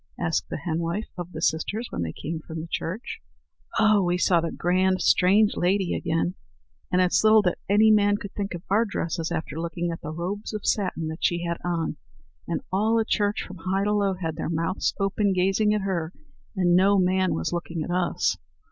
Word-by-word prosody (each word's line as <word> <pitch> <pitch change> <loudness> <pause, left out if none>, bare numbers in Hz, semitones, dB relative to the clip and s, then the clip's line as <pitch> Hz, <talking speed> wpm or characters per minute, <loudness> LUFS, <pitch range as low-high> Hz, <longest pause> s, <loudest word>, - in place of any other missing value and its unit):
asked 165 -2 -1
the - - -3
henwife 170 +6 -3
of 175 -1 -6
the 160 -1 -6
sisters 205 +9 0
when - - -3
they 80 -1 -2
came 160 - -5
from 160 0 -7
the 160 - -5
church. 185 +9 -4 0.6
"Oh, 215 -2 +5
we 175 -1 +1
saw 175 -2 +3
the 165 - -3
grand 185 +1 +1
strange 200 +3 +4
lady 185 +1 +1
again. 165 +1 -1 0.6
And 180 - +3
it's 180 - +2
little 215 0 +6
that 180 - 0
any 215 +2 +5
man 205 -1 +4
could 200 -1 -8
think 200 -3 -3
of 170 - -8
our 210 +4 +3
dresses 170 -6 -3
after 160 -2 -3
looking 170 0 -2
at 165 - -6
the 150 - -6
robes 190 +7 -4
of 210 - -5
satin 185 -6 0
that 160 +2 -7
she 175 -1 +1
had 170 -1 -2
on! 165 -3 -2 0.5
And 170 - -2
all 215 +4 +2
at 220 - -1
church, 205 -1 +1
from 185 - -10
high 190 +3 -1
to 210 +1 +1
low, 200 -2 +1
had 165 -3 -4
their 160 - -3
mouths 165 +3 0
open, 195 0 +1
gazing 195 +3 +2
at 210 -1 +1
her, 175 -4 -2 0.4
and 175 -2 +3
no 195 +2 +5
man 185 0 +2
was 80 - -2
looking 170 -2 -3
at 175 - -5
us." 180 -1 0
180 Hz, 205 wpm, -25 LUFS, 170-200 Hz, 0.6 s, little